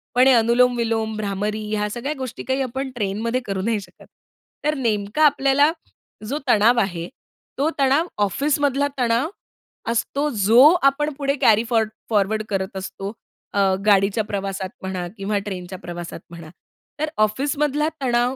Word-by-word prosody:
पण 250 Hz, +1 st, +6 dB
हे 265 Hz, -, +7 dB
अनुलोम 240 Hz, +2 st, +4 dB
विलोम, 225 Hz, -1 st, -1 dB
भ्रामरी 210 Hz, +1 st, -2 dB
ह्या 210 Hz, 0 st, -1 dB
सगळ्या 245 Hz, +7 st, -3 dB
गोष्टी 260 Hz, -3 st, -6 dB
काही 265 Hz, +1 st, -1 dB
आपण 265 Hz, +1 st, -3 dB
ट्रेनमध्ये 225 Hz, +3 st, -1 dB
करू 195 Hz, -1 st, -2 dB
नाही 220 Hz, +1 st, 0 dB
शकत. -, -, -16 dB, 0.6 s
तर 300 Hz, -, +2 dB
नेमका 215 Hz, +2 st, 0 dB
आपल्याला 285 Hz, +1 st, +4 dB, 0.6 s
जो 275 Hz, +6 st, -2 dB
तणाव 235 Hz, +1 st, +4 dB
आहे, 175 Hz, -5 st, -2 dB, 0.5 s
तो 285 Hz, +4 st, +2 dB
तणाव 275 Hz, +5 st, +3 dB, 0.2 s
ऑफिसमधला 285 Hz, +5 st, +1 dB
तणाव 240 Hz, +4 st, +1 dB, 0.6 s
असतो, 280 Hz, +5 st, -1 dB
जो 225 Hz, 0 st, +5 dB, 0.3 s
आपण 295 Hz, +2 st, -2 dB
पुढे 280 Hz, -1 st, 0 dB
कॅरी 220 Hz, 0 st, +5 dB
फॉर 225 Hz, -2 st, +3 dB, 0.2 s
फॉरवर्ड 215 Hz, 0 st, +1 dB
करत 190 Hz, -1 st, -2 dB
असतो. 195 Hz, +1 st, -6 dB, 0.4 s
अ, 200 Hz, -, +1 dB, 0.3 s
गाडीच्या 200 Hz, +1 st, +3 dB
प्रवासात 195 Hz, -2 st, -3 dB
म्हणा 185 Hz, -2 st, -4 dB
किंवा 205 Hz, +1 st, -1 dB
ट्रेनच्या 185 Hz, -2 st, -6 dB
प्रवासात 175 Hz, -1 st, -7 dB
म्हणा. 170 Hz, -2 st, -10 dB, 0.5 s
तर 310 Hz, +1 st, -1 dB
ऑफिसमधला 285 Hz, +7 st, +1 dB
तणाव 245 Hz, 0 st, +1 dB
230 Hz, 145 wpm, -22 LUFS, 200-270 Hz, 0.6 s, हे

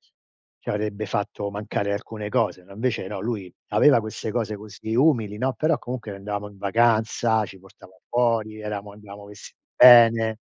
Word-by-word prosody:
ci -, -, -35 dB, 0.5 s
ci -, -, -11 dB
avrebbe 105 Hz, 0 st, -3 dB
fatto 100 Hz, +1 st, -3 dB
mancare 100 Hz, 0 st, -3 dB
alcune 105 Hz, +1 st, -5 dB
cose, 90 Hz, -3 st, -1 dB
no, 100 Hz, -, -16 dB
invece 110 Hz, -1 st, -2 dB
no, 100 Hz, -1 st, -5 dB
lui 105 Hz, -5 st, -4 dB, 0.2 s
aveva 115 Hz, +5 st, +5 dB
queste 110 Hz, 0 st, -6 dB
cose 110 Hz, -2 st, -2 dB
così 110 Hz, +2 st, -7 dB
umili, 115 Hz, -8 st, +2 dB
no, 130 Hz, +3 st, 0 dB
però 155 Hz, 0 st, +1 dB
comunque 120 Hz, -3 st, -6 dB
andavamo 105 Hz, +1 st, -5 dB
in 100 Hz, -, -18 dB
vacanza, 110 Hz, +1 st, +2 dB
ci 95 Hz, -, -13 dB
portava 95 Hz, -1 st, -18 dB
fuori, 115 Hz, -3 st, 0 dB
eravamo 105 Hz, -1 st, -5 dB
andavo 100 Hz, 0 st, -12 dB
vestiti 105 Hz, 0 st, -13 dB, 0.2 s
bene. 115 Hz, -3 st, +7 dB
105 Hz, 165 wpm, -24 LUFS, 100-115 Hz, 0.5 s, bene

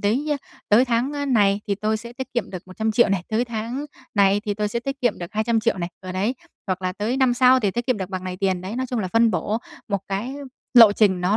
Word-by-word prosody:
đấy, 230 Hz, +9 st, 0 dB
a, 290 Hz, -, 0 dB, 0.3 s
tới 230 Hz, +5 st, +6 dB
tháng, 245 Hz, +3 st, 0 dB
a, 285 Hz, -1 st, -3 dB
này 205 Hz, -6 st, +3 dB
thì 200 Hz, -, 0 dB
tôi 215 Hz, +2 st, -1 dB
sẽ 235 Hz, +2 st, -9 dB
tiết 260 Hz, 0 st, -7 dB
kiệm 235 Hz, -5 st, -1 dB
được 185 Hz, -2 st, -6 dB
100.000.000 220 Hz, +4 st, +1 dB
này, 195 Hz, -3 st, 0 dB
tới 225 Hz, +2 st, +1 dB
tháng 235 Hz, +4 st, -4 dB, 0.3 s
này 200 Hz, 0 st, +4 dB
thì 205 Hz, -2 st, -1 dB
tôi 210 Hz, 0 st, -1 dB
sẽ 235 Hz, +3 st, -2 dB
tiết 275 Hz, +1 st, -5 dB
kiệm 240 Hz, -4 st, +1 dB
được 175 Hz, -1 st, -7 dB
200.000.000 225 Hz, -1 st, +1 dB
này, 170 Hz, -, -2 dB
ờ 185 Hz, -1 st, -7 dB
đấy, 205 Hz, +7 st, 0 dB, 0.3 s
hoặc 185 Hz, 0 st, -2 dB
là 185 Hz, 0 st, -1 dB
tới 215 Hz, +6 st, -2 dB
năm 260 Hz, -2 st, +3 dB
sau 255 Hz, +1 st, +5 dB
thì 205 Hz, -, +1 dB
tiết 240 Hz, +6 st, -3 dB
kiệm 255 Hz, -4 st, +2 dB
được 190 Hz, -1 st, -4 dB
bằng 185 Hz, -1 st, -4 dB
này 185 Hz, 0 st, -4 dB
tiền, 190 Hz, -2 st, 0 dB
đấy. 195 Hz, +5 st, -6 dB
Nói 260 Hz, 0 st, -1 dB
chung 245 Hz, -1 st, -3 dB
là 185 Hz, -3 st, -2 dB
phân 230 Hz, +2 st, +3 dB
bổ 215 Hz, +1 st, -1 dB, 0.3 s
một 200 Hz, -2 st, 0 dB
cái 225 Hz, +8 st, -3 dB, 0.4 s
lộ 225 Hz, -4 st, +9 dB
trình 195 Hz, -4 st, +3 dB
nó 185 Hz, +4 st, +2 dB
215 Hz, 265 wpm, -23 LUFS, 195-240 Hz, 0.4 s, lộ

